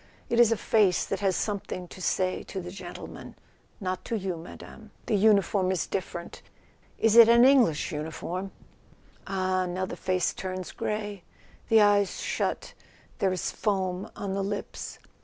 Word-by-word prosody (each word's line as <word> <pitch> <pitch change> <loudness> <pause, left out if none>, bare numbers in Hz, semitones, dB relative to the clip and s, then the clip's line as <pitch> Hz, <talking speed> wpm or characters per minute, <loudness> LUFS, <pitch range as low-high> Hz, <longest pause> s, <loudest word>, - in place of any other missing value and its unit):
It 235 - +1
is 235 -2 +6
a 230 - +2
face 200 -4 +3
that - - -3
has 195 -3 +1
some¬ 205 -2 -2
thing 180 -1 -6
to 185 - -11
say 185 0 0
to 190 - -5
the 180 -1 -7
gentleman; 195 - -9 0.4
not 185 -2 -3
to 230 - -1
you, 190 -3 -3
Madame. 180 +6 -11 0.2
The - - -1
uniform 200 -2 +3
is 185 - 0
different—is 190 +4 -4
it 230 -1 +10
an 235 +1 +7
English 245 - +4
uniform?... 170 +5 -4 0.8
Ah, 185 -1 0
now 185 +1 -2
the - - -6
face 185 -1 0
turns 185 -2 -5
grey; 210 -2 -4 0.5
the 225 -1 +6
eyes 205 -1 +3
shut, - - -2 0.5
there 190 - +2
is 185 -2 -2
foam 190 -3 -1
on 195 -1 -4
the 195 0 -1
lips. 200 +1 -5
195 Hz, 160 wpm, -27 LUFS, 185-210 Hz, 0.8 s, it